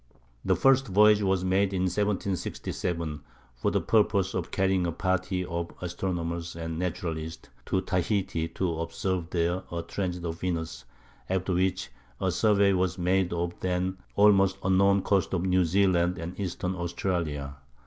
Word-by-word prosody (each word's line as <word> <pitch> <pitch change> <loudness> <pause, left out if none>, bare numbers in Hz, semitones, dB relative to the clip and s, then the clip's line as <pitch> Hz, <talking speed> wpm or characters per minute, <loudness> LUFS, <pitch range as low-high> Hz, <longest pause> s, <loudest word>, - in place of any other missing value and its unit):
The - - +2
first 135 0 +4
voyage 105 +2 +5
was 95 -2 +1
made 95 +1 +2
in 90 - 0
1767 90 -4 -2 0.3
for - - -1
the - - +1
purpose 100 -3 +2
of 90 -3 -3
carrying 95 -2 +1
a - - -1
party 95 +1 -1
of 85 0 -3
astronomers 85 -2 -3
and 80 -1 -4
naturalists 80 -3 -4 0.2
to 95 - +1
Tahiti 95 -2 -1
to 85 -2 -2
observe 85 +1 -2
there 85 +1 0
a 85 -1 -3
transit 90 0 -3
of 80 0 -4
Venus, 80 -8 -3 0.4
after 95 0 0
which 90 -7 0 0.3
a 95 -1 +1
survey 100 +1 +3
was 95 0 0
made 90 0 +1
of 85 0 -1
the - - -2
then 90 +1 -1 0.2
almost 100 -2 +5
unknown 100 +1 +4
coasts 95 -1 +1
of 90 0 -1
New 90 -1 +3
Zealand 90 0 +2
and 85 +4 -6
Eastern 90 -1 -2
Australia. 85 -5 -3
90 Hz, 150 wpm, -28 LUFS, 85-95 Hz, 0.4 s, voyage